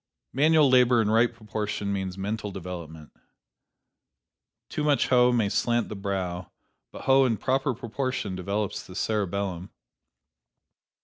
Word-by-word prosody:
Manual 155 +2 +4
labor 125 -2 +5
in 110 -1 +1
right 115 +2 +4
proportion 105 -3 -4
means 95 -1 -3
mental 105 +2 -3
development. 85 -5 -8 1.6
Too 150 - -3
much 145 -2 +2
hoe 125 -1 +5
may 115 -4 +2
slant 120 +3 0
the - - -5
brow, 95 -3 -3 0.4
but - - -10
hoe 135 0 +5
in 120 -4 +1
proper 135 +1 0
proportion 120 -3 -3
develops 100 +3 -2
the 90 - -13
cerebellum. 100 -3 -2
105 Hz, 125 wpm, -26 LUFS, 95-125 Hz, 1.6 s, labor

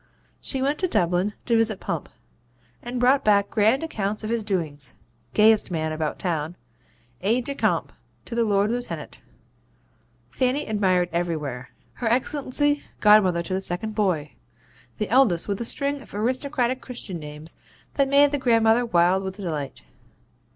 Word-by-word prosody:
'She 265 -1 -2
went 285 +2 0
to 370 - +1
Dublin 180 - +1
to 235 - +2
visit 225 -3 +2
Pump, - - -4 0.7
and 245 +1 -4
brought 260 +3 +4
back 200 -1 +3
grand 220 +7 +3
accounts 215 -9 -3
of 215 - -3
his 235 -1 0
doings 155 - -2 0.4
gayest 220 0 +5
man 160 -3 -2
about 155 -1 -2
town 165 -2 -2 0.7
Aide 230 +6 +1
de 280 - -1
Camp - - 0 0.3
to - - -8
the 235 0 +2
Lord 205 0 +2
Lieutenant 245 0 -5 1.1
Fanny 265 +3 0
admired 185 -4 +1
everywhere 150 -7 -3 0.2
Her 240 - -4
Excellency 290 +4 +1 0.2
godmother 195 -5 +5
to 185 - -5
the 190 - -1
second 195 +4 -4
boy: 180 -9 0 0.6
the 210 - -2
eldest 235 -10 +3
with 200 +1 -2
a - - -1
string 280 +3 -1
of 230 - -13
aristocratic 255 +2 0
Christian 220 -8 -7
names 150 +1 -9 0.4
that 275 -1 +1
made 285 +1 +5
the 290 - -1
grandmother 230 -1 +3
wild 180 -1 +3
with 190 0 -5
delight. 150 - -5
210 Hz, 150 wpm, -24 LUFS, 175-250 Hz, 1.1 s, gayest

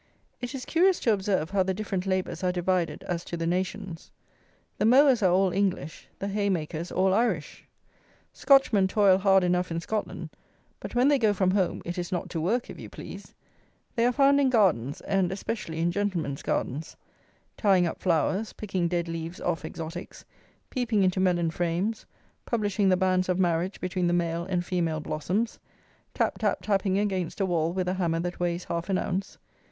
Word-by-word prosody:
It 245 +3 -4
is 255 - -6
curious 360 +2 +3
to 230 - +3
observe 190 -5 -1
how 200 -1 +2
the 190 0 0
different 195 -2 -3
labours 185 0 -1
are 180 - +2
divided 180 -1 -1
as 175 -1 -3
to 170 - -5
the 165 - -2
nations. 185 0 -3 0.7
The - - +2
mowers 260 +1 +6
are 185 -3 +4
all 190 +1 +3
English; 185 -6 -2
the 195 - -4
haymakers 180 -5 -2
all 190 0 +2
Irish. 200 -8 -1 0.7
Scotchmen 250 -8 +4
toil 195 -2 +4
hard 195 -1 +4
enough 180 0 +1
in 165 0 -2
Scotland; 215 +5 -4 0.5
but - - -8
when 250 +2 +4
they 285 -1 +4
go 215 -3 +3
from 185 -1 +2
home 190 -2 0
it 175 +1 -4
is 175 +2 -4
not 180 - -3
to 165 - -2
work, 230 +9 0
if - - -10
you - - -8
please. - - -10 0.6
They 230 - +2
are - - +3
found 280 +2 +4
in 270 - +3
gardens, 175 - +2
and 195 -3 0
especially 190 -4 -4
in 170 +1 +1
gentlemen's 175 -8 -2
gardens. 145 +6 -3 0.6
Tying 190 -4 +3
up 170 - -3
flowers, 185 +5 +1
picking 190 -4 -2
dead 170 0 -1
leaves 165 +1 -5
off 175 -2 -2
exotics, 165 +3 -7 0.5
peeping 235 -6 +1
into 185 0 +1
melon 175 -3 +2
frames, 175 +6 -2 0.4
publishing 205 -3 +1
the 185 - +4
banns 185 0 +1
of 180 - +2
marriage 180 +1 0
between 185 -1 -1
the 175 - +1
"male" 170 -1 0
and 180 -1 -1
"female" 165 -4 -1
blossoms, 180 +9 -2 0.6
tap - - 0
tap - - 0
tapping 195 -2 +1
against 190 -4 -1
a 195 - +2
wall 170 -3 0
with 185 0 -2
a 180 - +1
hammer 170 -3 0
that 175 +1 -4
weighs 175 0 -1
half 170 +2 -4
an 190 - +2
ounce. 190 +1 -3
185 Hz, 185 wpm, -27 LUFS, 175-205 Hz, 0.7 s, mowers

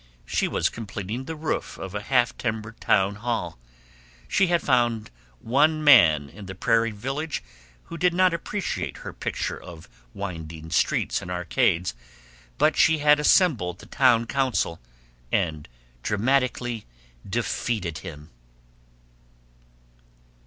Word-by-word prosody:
She - - 0
was - - +1
completing 110 +2 -5
the 160 - -5
roof 155 +1 -3
of 95 -1 -7
a 105 - -3
half 120 +1 +2
timbered 110 -1 -4
town 100 0 +2
hall. 105 - -3 0.7
She 190 - +3
had 175 0 +3
found 120 - +1 0.3
one 155 - +2
man 85 - +7
in 100 +6 -11
the 95 - -7
prairie 115 +4 +2
village 135 +8 -4 0.4
who 170 - -9
did 180 0 +3
not 185 0 +3
appreciate 190 +4 -3
her - - -6
picture - - -4
of 80 -2 -11 0.3
winding 80 -4 -6
streets - - +1
and 90 - -8
arcades, 90 0 +1 0.6
but - - +3
she 160 0 +4
had 150 0 +4
assembled 140 - +3
the - - -13
town 120 -4 +3
council 125 -10 0 0.5
and 75 -2 -1 0.3
dramatically 120 - 0 0.4
defeated 105 -5 -2
him. 75 -2 -10
115 Hz, 125 wpm, -25 LUFS, 90-135 Hz, 0.7 s, man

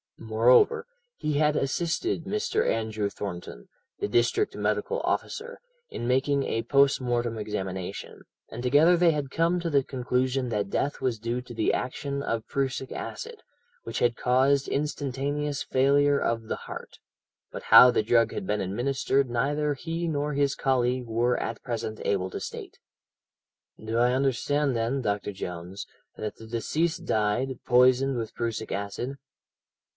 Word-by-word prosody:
Moreover, 115 +3 +4 0.3
he 150 - -2
had 150 +1 +2
assisted 165 +4 -1
Mr. 210 +2 0
Andrew 110 -2 -1
Thornton, 90 -12 -7 0.3
the - - -1
district 120 - +1
medical 485 0 -1
officer, 480 +2 -3 0.3
in 120 - -5
making 135 +2 +2
a 115 -3 -1
postmortem 120 -3 +2
examination, 95 -3 -5 0.3
and 115 - -7
together 145 +8 +5
they 170 -1 +5
had 145 -3 -3
come 170 +2 +1
to 170 -1 -2
the 140 -3 +3
conclusion 130 0 -1
that 105 -3 -1
death 140 +7 -1
was 125 -4 -1
due 115 +3 -2
to 125 -1 -11
the 110 -1 +1
action 140 +2 -3
of 115 -3 -2
prussic 135 -1 -2
acid, 465 -1 -6 0.4
which - - -4
had 120 -1 +2
caused 135 +3 +2
instantaneous 145 0 -2
failure 140 +2 +3
of 115 -1 -1
the 110 - -3
heart, - - -8 0.5
but - - -7
how 125 - +9
the 115 - +1
drug 115 0 +3
had - - -4
been 105 +1 0
administered 130 +6 0
neither 145 +5 0
he 165 +4 -4
nor 150 -1 -1
his 140 -1 +1
colleague 125 -1 +1
were 120 +2 +1
at 115 - -4
present 115 -3 -4
able 95 -2 0
to - - -5
state. - - -7 1.1
"'Do 110 +1 -2
I 120 +1 +3
understand, 135 +1 +1
then, 115 +4 0
Dr. 105 -2 -1
Jones, 90 0 -6 0.3
that 105 - -5
the 110 - -12
deceased 155 +9 -1
died, 110 +5 0
poisoned 130 +1 +4
with 115 -2 -4
prussic 115 -2 -3
acid?' 100 +7 -4
125 Hz, 150 wpm, -27 LUFS, 115-140 Hz, 1.1 s, how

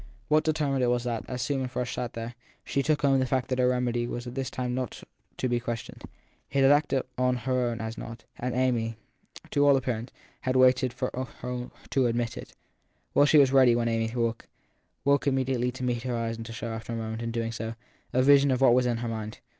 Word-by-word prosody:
What 155 0 +4
determined 145 -4 +1
it - - +3
was 120 0 +1
that 120 -3 -3
as 125 -2 -2
Susan 135 -3 -1
Frush 125 -1 -3
sat 120 -1 -4
there, 115 +1 -5 0.3
she 140 - 0
took 145 +1 +1
home 135 -1 +4
the 130 - +1
fact 130 -1 0
that 130 - 0
the 125 -1 +3
remedy 120 -1 0
was 120 0 -5
by 120 - -5
this 135 0 -3
time 125 -1 -3
not 125 -1 -4 0.3
to 130 - 0
be 120 -1 +1
questioned. 120 -1 -5 0.5
It 135 0 +2
had 135 - +7
acted 145 -2 +3 0.2
as 125 0 +3
her 130 0 +1
own 120 -1 -2
had 110 0 -5
not, 115 0 -8 0.2
and 125 0 -2
Amy, 120 -3 +1 0.5
to 145 - +3
all 140 -1 +6
appearance, 125 -2 -3 0.3
had 130 0 -1
only 130 0 +7
waited 130 0 +3
for 125 +1 -3 0.3
her 125 0 -4 0.2
to 130 -2 +3
admit 120 0 -1
it. - - -9 0.6
Well, 145 - +5
she 155 - +5
was 135 -2 +6
ready 130 -3 +6
when 120 0 +1
Amy 115 0 0
woke 115 -1 -1 0.6
woke 140 0 +3
immediately 130 -2 +1
to 130 0 -7
meet 120 -2 0
her 125 -1 -2
eyes 115 0 -2
and 115 0 -7
to - - -7
show, 115 0 -5
after 115 +1 -5
a - - -2
moment, 110 0 -4
in 115 - -2
doing 115 0 -2
so, 115 0 -5 0.4
a 130 - +3
vision 140 +1 +6
of 130 -2 +2
what 130 -3 +6
was 125 0 +3
in 120 -1 0
her - - -2
mind. 110 -1 -5
125 Hz, 235 wpm, -28 LUFS, 115-130 Hz, 0.6 s, had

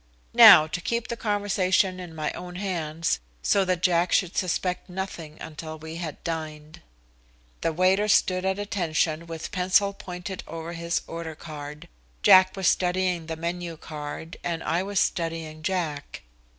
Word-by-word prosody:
Now 155 - +10
to 160 +3 -4
keep 235 +5 -2
the 235 - -2
conversation 195 -3 +1
in 175 -3 -8
my 155 -1 -2
own 180 0 -8
hands, 165 -4 -2 0.2
so 200 - +3
that 180 -1 -1
Jack 175 -1 +3
should 185 -2 +2
suspect 180 0 -1
nothing 180 -4 -6
until 155 0 -7
we 160 +1 -8
had 165 -4 -6
dined. 155 -2 -5 0.8
The 165 - +1
waiter 185 +5 +3
stood 185 -3 +3
at 190 0 0
attention 170 -5 -1
with 165 -1 -6
pencil 190 +2 +2
pointed 180 -1 -7
over 165 +1 -6
his 170 0 -2
order 165 -1 -6
card. 150 -1 -9 0.4
Jack 185 0 +7
was 190 -2 +1
studying 180 -2 +1
the 165 - -3
menu 170 0 -4
card, 155 +1 -7
and 165 -1 -2
I 170 +2 0
was 200 0 -1
studying 165 -2 -2
Jack. 155 -4 -3
170 Hz, 150 wpm, -26 LUFS, 160-185 Hz, 0.8 s, Now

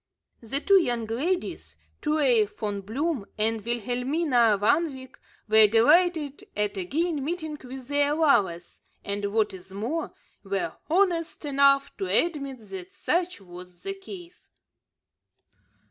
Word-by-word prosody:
The 245 +4 +2
two 390 +4 +5
young 240 -7 -1
ladies, 300 +12 -3 0.2
Truey 280 -8 +3
Von 205 -1 -5
Bloom 255 - -2
and 220 0 +1
Wilhelmina 245 +1 +1
Van 290 +11 +2
Wyk, 260 -1 -12 0.3
were 220 0 +7
delighted 295 - +3
at 210 0 -1
again 290 - -1
meeting 315 0 -4
with 255 0 -9
their 290 +1 +2
lovers, 190 - +1 0.2
and, 200 0 -2
what 215 -1 +1
is 190 0 -12
more, 235 +12 -3 0.3
were 195 -4 -2 0.2
honest 340 -3 +1
enough 275 -1 +3
to 195 - -3
admit 275 - 0
that 185 -1 -7
such 350 - -1
was 180 -1 -13
the 390 - -3
case. 375 -2 -12
260 Hz, 125 wpm, -26 LUFS, 210-315 Hz, 0.3 s, were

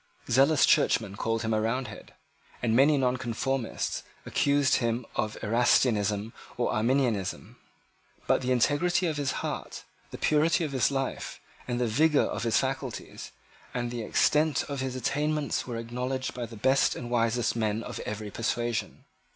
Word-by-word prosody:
Zealous 140 +5 +5
Churchmen 100 -3 +2
called 115 +2 -1
him 110 0 0
a 110 - +1
Roundhead; 120 +4 -4 0.5
and 115 -2 +2
many 145 +4 +5
Nonconformists 125 -1 -1 0.2
accused 140 -1 +2
him 115 0 -1
of 110 0 -2
Erastianism 110 -2 +2 0.2
and 120 - +1
Arminianism. 115 -4 0 0.7
But - - +2
the 130 0 -1
integrity 155 +9 +2
of 160 -3 -1
his 140 -2 0
heart, - - -5 0.3
the - - -8
purity 155 +3 +2
of 155 - -3
his 130 -3 +2
life, 135 -1 -3 0.3
the 120 0 0
vigour 150 +7 +3
of - - -3
his 115 -1 +2
faculties, - - -4 0.4
and 120 -1 -2
the 120 -1 -4
extent 150 +7 +2
of 140 -1 -5
his 130 -1 -3
attainments 150 +3 -1
were 120 -2 -4
acknowledged 125 +3 -3
by 120 -2 -5
the 115 - -11
best 130 +5 +3
and 120 -1 -6
wisest 115 0 +1
men 110 -1 -1
of - - -6
every 105 0 -5
persuasion. 120 +1 -2
125 Hz, 150 wpm, -28 LUFS, 115-135 Hz, 0.7 s, Zealous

